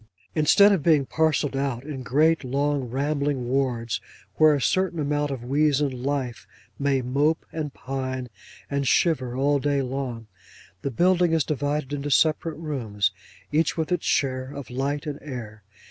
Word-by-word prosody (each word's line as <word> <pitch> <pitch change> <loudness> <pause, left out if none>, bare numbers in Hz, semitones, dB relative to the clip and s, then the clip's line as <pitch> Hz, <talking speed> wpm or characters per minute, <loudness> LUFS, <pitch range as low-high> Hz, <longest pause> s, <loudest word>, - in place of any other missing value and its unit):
Instead 200 +7 +6
of 195 -5 +2
being 150 -3 +4
parcelled 150 -2 +1
out 135 -3 -2
in 140 -3 -6
great, 155 +6 +2
long, 140 +1 0
rambling 140 0 -1
wards, 125 -3 -1 0.4
where 155 -1 +6
a - - -1
certain 185 +5 +1
amount 145 0 0
of 135 -4 -5
weazen 145 +2 +2
life 130 -2 -3 0.3
may 140 -2 +1
mope, 145 +6 +1
and 155 -3 -4
pine, 130 -1 -4 0.4
and 140 -1 -1
shiver, 130 -6 +2
all 140 +1 +2
day 145 0 +1
long, 125 -3 -4 0.6
the - - -2
building 175 +5 +3
is 160 -2 +3
divided 145 -1 -2
into 145 0 -3
separate 155 +2 +2
rooms, 115 -10 -1 0.4
each 155 +2 +1
with 160 +1 -2
its 180 - 0
share 130 -1 0
of 140 -5 -8
light 140 +4 -2
and 145 -2 -4
air. 115 -7 -7
140 Hz, 155 wpm, -25 LUFS, 130-150 Hz, 0.6 s, Instead